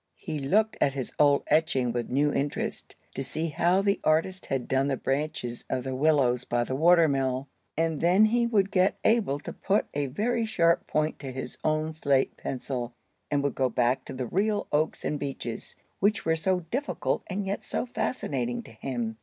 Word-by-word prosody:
He 150 - -4
looked 210 +11 +2
at 135 - +3
his 135 -2 -4
old 145 -1 +5
etching 145 -5 +2
with 120 0 -3
new 145 +3 +2
interest, 145 +1 -3 0.2
to 135 - -4
see 160 +5 -3
how 175 +5 +2
the 200 0 +2
artist 165 +5 +1
had 135 -2 -2
done 135 +1 +2
the 135 -2 0
branches 135 -4 -2
of 130 -1 -1
the 130 0 -3
willows 130 -3 +2
by 120 -1 0
the 130 - -3
water 170 +3 +5
mill. 135 -1 0 0.3
And 165 -2 0
then 185 +5 +5
he 235 +2 +2
would 200 -4 +2
get 185 +1 +3
Abel 215 -11 +3
to - - -7
put 200 +2 +1
a 145 -1 -1
very 230 - 0
sharp 170 -6 +2
point 155 +1 0
to 135 -2 -6
his 130 +1 -6
own 155 0 0
slate 140 -4 +1
pencil, 125 -2 -4 0.3
and 145 -1 +1
would 140 -3 0
go 130 -1 +1
back 120 +2 +1
to - - -7
the 130 -1 -3
real 205 - 0
oaks 155 +2 0
and 150 - -1
beeches, 135 -5 -5 0.2
which 205 +2 +2
were 160 0 +3
so 180 +3 +1
difficult 280 +4 -1
and 195 +1 -3
yet 195 +1 -3
so - - -2
fascinating 135 - -2
to - - -13
him. 115 -1 -4
145 Hz, 195 wpm, -27 LUFS, 130-185 Hz, 0.3 s, old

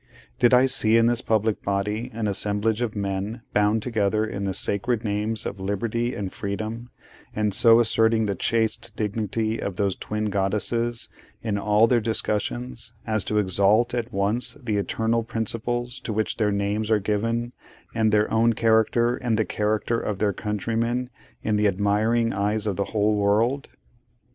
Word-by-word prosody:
Did 120 - +5
I 125 +1 +6
see 115 -4 +3
in 115 - +4
this 120 +1 +2
public 110 -2 0
body 105 +3 -2
an 110 -1 -3
assemblage 105 +2 0
of 115 -3 -2
men, 100 +3 -3
bound 105 +1 +2
together 110 -2 0
in 100 -2 -4
the 95 - -1
sacred 115 +3 0
names 105 +1 -2
of 100 - -5
Liberty 115 +5 -2
and 95 -2 -4
Freedom, 110 +4 -5 0.5
and 105 -1 0
so 115 +4 +6
asserting 110 -1 +3
the 100 - 0
chaste 110 +3 -1
dignity 110 +1 -2
of 100 - -3
those 100 -1 0
twin 105 0 -3
goddesses, 110 +4 -1 0.4
in 105 -3 -1
all 105 +2 +4
their 120 0 +2
discussions, 65 - -2
as 110 -2 0
to 105 - -1
exalt 100 +4 +3
at 120 -1 -2
once 105 +7 -1
the 110 -6 -2
Eternal 110 +4 0
Principles 115 +2 -3
to - - -5
which 110 0 -1
their 105 -2 +1
names 100 +2 -1
are 110 - +4
given, 115 +4 -1 0.4
and 110 -2 +2
their 105 0 +3
own 115 +1 +4
character 115 +2 +2
and 120 -3 -1
the 110 - +1
character 105 +2 -1
of 105 - -3
their 105 0 +1
countrymen, 115 +5 -2 0.3
in 110 -1 +1
the 105 0 +3
admiring 105 +4 +1
eyes 105 +2 -1
of 105 -3 -1
the 100 - -1
whole 105 0 +1
world? 110 +7 +1
110 Hz, 165 wpm, -24 LUFS, 100-115 Hz, 0.5 s, I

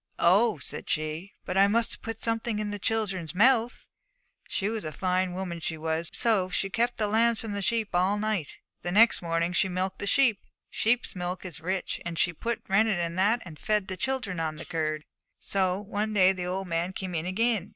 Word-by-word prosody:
"Oh," 200 +3 +5
said 135 - -6
she, 155 +5 -3
"but 185 - -2
I 200 - +7
must 230 +3 +1
put 225 0 -5
something 225 -1 -1
in 210 -1 -2
the 205 - -4
children's 195 -6 -1
mouths!" 240 +3 +3 0.6
She 200 - -1
was 220 0 -2
a 155 - -4
fine 185 +2 0
woman, 180 -2 -4
she 160 0 -3
was. 160 +1 -2
So 210 -6 +2
she 195 +2 -2
kept 235 +4 0
the 215 - +1
lambs 225 +2 +3
from 225 - -5
the 200 0 -3
sheep 220 +1 0
all 185 +3 +2
night, 210 -7 -2 0.3
and 175 +1 -2
next 230 +2 +6
morning 170 0 0
she 190 +2 +2
milked 185 +1 -2
the 200 - -2
sheep. 235 -4 +4 0.3
Sheep's 240 0 +1
milk 180 +1 -4
is 170 -3 -8
rich, 185 +3 -2
and 170 -1 -5
she 175 - +2
put 235 +8 -3
rennet 210 -1 +3
in 170 -1 -1
that, 215 +6 +2
and 160 -4 -10
fed 210 -3 0
the 185 - -3
children 215 -4 -2
on 160 -1 -2
the 160 - -8
curd. 155 -2 -2 0.3
'So 190 -1 +1
one 210 +1 -3
day 190 -1 +6
the 180 -2 -4
old 190 +1 -3
man 170 +2 -1
came 190 -2 -5
in 165 +1 -2
again. 210 0 +1
190 Hz, 210 wpm, -28 LUFS, 175-220 Hz, 0.6 s, I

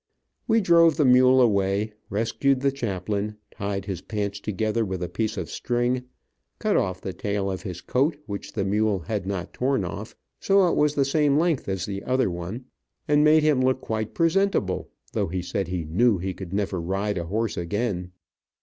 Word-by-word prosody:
We 225 -1 +4
drove 170 -4 +5
the 150 - +3
mule 130 +1 +6
away, 100 -2 +2 0.2
rescued 115 +5 +1
the 140 0 +2
chaplain, 105 -4 -3
tied 100 0 -4
his 95 -4 -4
pants 100 -1 -3
together 110 +2 -1
with 95 -3 -3
a - - -2
piece 110 +6 -2
of - - -4
string, 125 +1 -1 0.5
cut - - 0
off 95 -1 0
the 95 - -5
tail 100 0 -2
of 95 - -4
his 90 -3 -6
coat 145 +4 +1
which 100 -2 -6
the 100 -3 -1
mule 105 -1 +1
had 100 +3 -3
not 95 -3 -4
torn 130 -6 0
off, 100 +6 -6 0.2
so 195 -1 +4
it - - +1
was 150 0 +2
the 140 - +3
same 145 0 +2
length 160 - +1
as 95 -3 -2
the 100 -1 -4
other 130 -6 +1
one, 90 +9 -6 0.4
and 150 0 +4
made 155 0 +5
him 150 -4 +3
look 130 0 +2
quite 110 -3 -4
presentable, 165 - +1 0.2
though - - 0
he 90 +1 -3
said 95 +1 -2
he 90 -2 -3
knew 100 +7 +3
he 95 +2 -3
could 90 -1 -8
never 95 -3 -1
ride 95 +3 -1
a 85 - -4
horse 110 +5 -1
again. 90 0 -2
105 Hz, 190 wpm, -25 LUFS, 95-130 Hz, 0.5 s, mule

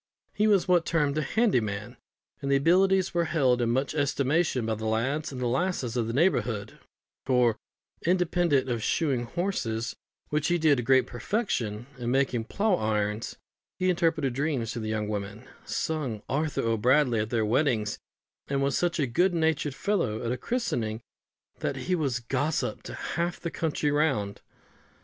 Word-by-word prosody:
He 210 +1 +2
was 200 -4 +3
what 180 -2 +4
is - - -5
termed 150 -3 +1
a - - +1
handy 215 - +2
man, 105 +2 -5 0.5
and 140 - -3
his 140 - +4
abilities 185 +5 +3
were 170 -1 +2
held 135 -6 +2
in 120 - +1
much 130 +5 0
estimation 145 -2 +1
by 110 - 0
the 110 0 -4
lads 130 +8 -1
and 130 - -6
the 125 - -1
lasses 130 -2 -1
of 120 -3 0
the - - -2
neighbourhood; 120 - 0 0.4
for, 125 -4 +2 0.4
independent 175 -5 +2
of 120 -3 -1
shoeing 130 -1 0
horses, 115 - -2 0.3
which 150 0 0
he 175 - +2
did 155 -4 +4
to - - 0
great 130 +2 +4
perfection, 120 - -2
and 120 0 -2
making 130 -4 +1
plough 200 - +1
irons, 105 0 -1 0.4
he 185 0 +2
interpreted 160 -6 +1
dreams 135 -5 -1
for 120 - -4
the 110 -1 -4
young 110 -1 -1
women, 105 0 -5 0.2
sung 135 -10 -2
"Arthur 150 +2 -1
O'Bradley" 120 +2 +3
at 105 0 -1
their 115 -2 +1
weddings, 110 -3 +1 0.5
and 140 0 0
was 140 0 +1
so 175 - +2
good 170 +3 +1
natured 160 -3 +1
a - - -17
fellow 130 - 0
at 115 - 0
a 125 - -1
christening, 120 - -2 0.6
that - - -2
he 185 - -2
was 140 -8 0
gossip 145 +6 -1
to - - -8
half 170 +1 -2
the 170 - -4
country 155 -2 -1
round. 135 -10 0
135 Hz, 175 wpm, -27 LUFS, 115-165 Hz, 0.6 s, what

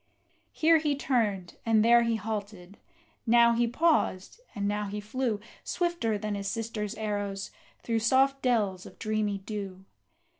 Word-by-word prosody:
Here 325 0 +4
he 300 -2 0
turned, 215 -10 -1
and 220 -1 +3
there 235 0 +6
he 230 -1 +1
halted, 205 -3 -6 0.5
now 235 0 +6
he 235 0 +2
paused, 280 - +1 0.2
and 200 -1 -1
now 205 0 -1
he 205 +1 -4
flew, 220 +1 -2 0.2
Swifter 340 - -1
than 210 0 -3
his 200 -1 -3
sister's 220 0 -3
arrows, 205 -2 -3 0.3
through 230 -1 0
soft 265 +4 +3
dells 205 -7 0
of - - -15
dreamy 215 -2 -1
dew. 195 -2 -7
215 Hz, 145 wpm, -28 LUFS, 205-235 Hz, 0.5 s, there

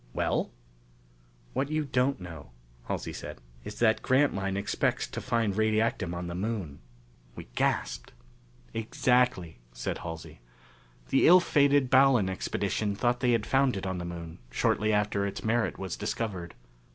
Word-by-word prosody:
"Well?" - - 0 1.0
"What 140 - -1
you 155 0 0
don't 130 -1 +1
know," 85 -7 -9 0.4
Halsey - - -3
said, - - -8 0.2
"is - - -8
that 110 -2 +3
Grantline 100 -8 +1
expects 100 - 0
to - - -6
find 115 -5 0
radiactum 110 -4 +1
on 90 +1 -4
the 85 - -5
Moon." 95 -6 -3 0.6
We - - -10
gasped. - - -1 0.6
"Exactly," 115 - +1
said - - -4
Halsey. 80 -5 -8 0.7
"The 135 - +4
ill 180 +3 +9
fated 140 -5 +3
Ballon 130 -7 +5
Expedition 100 +2 -2
thought 120 +3 +1
they 125 -1 +2
had 115 -2 +1
found 135 -4 +2
it 95 - -5
on 95 -1 -2
the 85 - -4
Moon, 85 -1 -7
shortly 105 +11 +1
after 105 -1 +1
its 100 - -6
merit 110 +1 0
was 95 -3 -4
discovered. 105 -5 -4
110 Hz, 145 wpm, -29 LUFS, 90-125 Hz, 1.0 s, ill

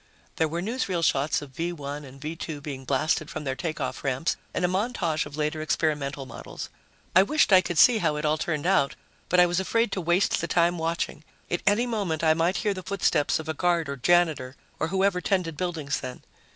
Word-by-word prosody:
There 160 - +2
were 170 +3 -3
newsreel 200 -6 -1
shots 145 0 +1
of 140 - -11
V 165 +6 -2
1 145 -2 -6
and 135 0 -13
V 155 +3 -5
2 160 -2 -5
being 140 -2 -7
blasted 145 +3 0
from 155 - -5
their 135 -2 -2
takeoff 155 +3 -4
ramps 135 +4 0 0.2
and 180 - 0
a - - +3
montage 185 -6 -1
of 145 0 -10
later 150 +1 -1
experimental 150 -3 -1
models. 125 - -8 0.5
I 185 - +9
wished 255 +1 +3
I 185 - +8
could 175 -2 -4
see 235 +4 +7
how 155 -5 +1
it 150 +1 -3
all 155 +1 +1
turned 155 -2 -2
out, 180 -7 +2 0.3
but 180 - +4
I 180 - +8
was 175 +1 0
afraid 230 +3 +1
to 190 - -2
waste 175 +3 +2
the 170 - -2
time 170 0 +2
watching. 165 -2 -2 0.3
At 175 - 0
any 210 +4 +4
moment, 200 -10 -2
I 160 -1 +5
might 165 +3 +1
hear 205 - +2
the 185 - -6
footsteps 185 -6 +1
of 160 - -7
a 160 - -1
guard 170 0 +1
or 140 - -3
janitor 150 -3 +2 0.2
or 160 - 0
whoever 190 +1 +1
tended 180 -4 0
buildings 160 -5 -2
then. 130 -1 -7
165 Hz, 215 wpm, -26 LUFS, 150-180 Hz, 0.5 s, I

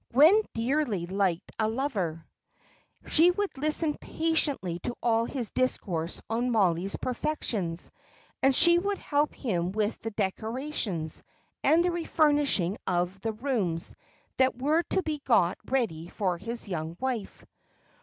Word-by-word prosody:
Gwen 320 - +7
dearly 230 - 0
liked 185 -2 -1
a 220 - +2
lover; 205 - -2 0.8
she 330 +3 +5
would 395 +1 -1
listen 305 +2 +1
patiently 290 - 0
to 240 - -4
all 230 -1 +2
his 245 -3 -4
discourse 180 -10 -1
on 235 +3 0
Mollie's 195 -4 +1
perfections, 225 - -2 0.5
and 270 0 +4
she 345 +3 +7
would 400 +2 -1
help 295 -2 0
him 180 -8 -1
with 210 +2 -1
the 225 - -4
decorations, 220 - -3 0.4
and 335 +2 +4
the 355 - +2
refurnishing 295 - +2
of 180 +1 -1
the 225 +1 -2
rooms 215 -9 -2 0.4
that 260 -1 +2
were 300 +5 +2
to 380 - +1
be 310 -2 -3
got 190 -8 +3
ready 215 -12 -1
for 180 -2 -2
his 230 +2 -3
young 165 -2 -4
wife. 250 -6 -4
230 Hz, 135 wpm, -28 LUFS, 185-290 Hz, 0.8 s, Gwen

